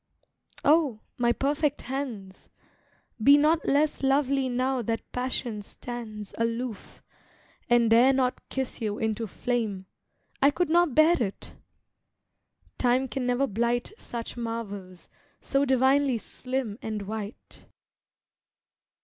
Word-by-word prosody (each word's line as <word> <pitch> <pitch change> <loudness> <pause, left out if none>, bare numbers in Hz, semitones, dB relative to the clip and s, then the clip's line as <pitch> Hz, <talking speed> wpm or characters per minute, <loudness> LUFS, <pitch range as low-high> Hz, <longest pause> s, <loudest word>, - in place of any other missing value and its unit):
Oh! 285 -7 +3 0.2
my 240 -1 +3
perfect 290 +3 0
hands! 240 -8 -6 0.7
Be 280 +6 +8
not 310 +2 +2
less 295 +2 +2
lovely 270 -1 +2
now 255 +1 0
that 225 0 -3
passion 250 -3 -3
stands 215 -1 -8
Aloof, 230 -1 -3 0.7
and 235 -2 +4
dare 240 +4 +7
not 260 -1 -1
kiss 265 -2 -4
you 210 -2 -2
into 220 0 -1
flame— 215 -4 -2 0.6
I 280 - +7
could 350 +3 0
not 345 -5 +3
bear 310 0 +5
it! 200 -4 -4 1.3
Time 255 +1 +2
can 255 -1 -3
never 250 +2 +2
blight 235 - -1
Such 235 - -6
marvels, 205 -6 -6 0.3
so 275 0 +1
divinely 265 0 +3
slim 255 -1 -4
and 215 -2 -4
white. 210 +1 -8
245 Hz, 115 wpm, -27 LUFS, 225-270 Hz, 1.3 s, Be